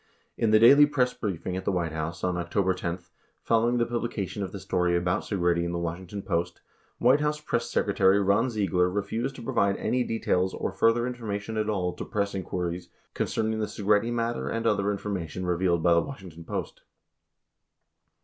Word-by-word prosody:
In 115 - +1
the 110 - +6
daily 140 +6 +8
press 130 -4 +1
briefing 90 -3 -4
at 95 - -4
the 100 - 0
White 85 -3 -1
House 80 +1 -4
on 90 -1 0
Octo 90 +3 -1
ber 95 0 +2
10, 85 -1 -3 0.5
following 115 +2 +2
the 120 - +2
publication 115 -4 -3
of 95 - -3
the 100 - -7
story 90 -2 +1
about 90 0 0
Segretti 85 -4 0
in 85 0 -2
the - - -1
Washington 90 +4 -5
Post, 85 -2 -2 0.4
White 130 +4 +4
House 150 0 0
Press 150 - -2
Secretary 95 +1 +3
Ron 100 +5 +2
Ziegler 95 -5 +1
refused 110 +7 -2
to - - -9
provide 100 -3 +1
any 125 0 0
details 95 -5 0
or - - -2
further 115 +1 +2
information 110 -3 -4
at 110 0 -1
all 90 -4 -1
to - - -6
press 100 -1 -2
inquiries 90 -2 -4 0.2
concerning 110 0 -1
the 105 - -1
Segretti 105 +3 +1
matter 115 0 -1
and 115 0 -2
other 105 -2 +2
information 95 -3 -4
revealed 85 -1 +1
by 85 - +5
the 85 - +4
Washington 90 - -9
Post. - - -5
100 Hz, 185 wpm, -27 LUFS, 90-115 Hz, 0.5 s, daily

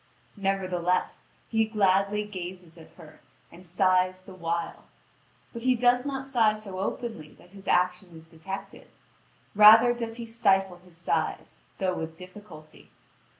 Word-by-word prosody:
Nevertheless, 185 -3 -1 0.2
he 225 -1 +1
gladly 200 -1 +1
gazes 180 -4 -8
at 165 -2 -15
her, 155 -3 -15 0.3
and 175 +2 -15
sighs 185 +1 +1
the 190 - -12
while; 170 -1 -4 0.7
but 235 - -7
he 255 +1 +2
does 245 +2 +2
not 270 -1 -4
sigh 225 -5 +3
so 200 -3 -8
openly 195 -5 -5
that 180 - -20
his 195 -1 -14
action 180 -1 0
is 160 - -14
detected; 165 +4 -9 0.7
rather 220 +3 +8
does 230 -1 -5
he 235 - -6
stifle 195 -5 +1
his 180 -1 -19
sighs, 165 -2 -3
though 185 -1 0
with 160 -1 -6
difficulty. 180 -4 -14
190 Hz, 140 wpm, -27 LUFS, 175-215 Hz, 0.7 s, rather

